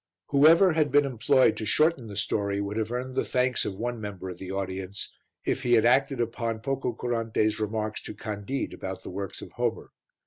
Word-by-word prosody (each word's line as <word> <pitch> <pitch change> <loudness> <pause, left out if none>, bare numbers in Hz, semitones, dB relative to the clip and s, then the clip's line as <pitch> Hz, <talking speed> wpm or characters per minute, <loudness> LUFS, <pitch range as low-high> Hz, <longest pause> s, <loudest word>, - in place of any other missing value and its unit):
Whoever 160 +6 +6
had 155 -3 +2
been 145 +1 +5
employed 130 +1 +3
to 110 - -3
shorten 155 -1 +2
the 100 - -8
story 100 0 0
would 100 +1 -3
have 110 0 -1
earned 125 +1 -3
the - - +2
thanks 125 0 +1
of 95 - -3
one 120 +2 -3
member 95 -3 -6
of 90 - -10
the 95 - -7
audience 95 0 -4 0.3
if - - 0
he 120 - +2
had 115 -1 +5
acted 135 +2 +3
upon 115 -1 -2
Pococurante's 115 -4 -1
remarks 110 0 -2
to - - -6
Candide 105 +5 -4
about 95 0 -6
the - - -7
works 100 +1 -5
of - - -10
Homer. - - -2
115 Hz, 195 wpm, -27 LUFS, 100-130 Hz, 0.3 s, Whoever